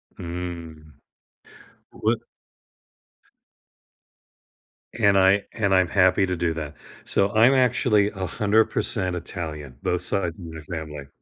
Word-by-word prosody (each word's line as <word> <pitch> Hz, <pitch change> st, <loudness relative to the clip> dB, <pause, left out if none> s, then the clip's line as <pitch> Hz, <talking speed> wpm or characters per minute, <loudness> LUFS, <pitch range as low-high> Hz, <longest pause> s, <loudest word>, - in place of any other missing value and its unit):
Mm. 85 Hz, -3 st, -7 dB, 1.0 s
What -, -, 0 dB, 2.7 s
And 100 Hz, -4 st, +3 dB
I 95 Hz, +2 st, +4 dB
and 100 Hz, -3 st, 0 dB
I'm 95 Hz, -2 st, +3 dB
happy 95 Hz, 0 st, +3 dB
to 90 Hz, -1 st, -2 dB
do 85 Hz, -1 st, 0 dB
that. 75 Hz, -2 st, -6 dB, 0.3 s
So, 100 Hz, 0 st, +2 dB
I'm 120 Hz, +5 st, +6 dB
actually 125 Hz, -5 st, +3 dB
100% 100 Hz, 0 st, +1 dB
Italian, 75 Hz, -6 st, -6 dB
both 90 Hz, 0 st, 0 dB
side 90 Hz, -1 st, 0 dB
of 80 Hz, -, -13 dB
my 80 Hz, -2 st, -8 dB
family 75 Hz, -4 st, -7 dB
90 Hz, 105 wpm, -24 LUFS, 80-100 Hz, 2.7 s, I'm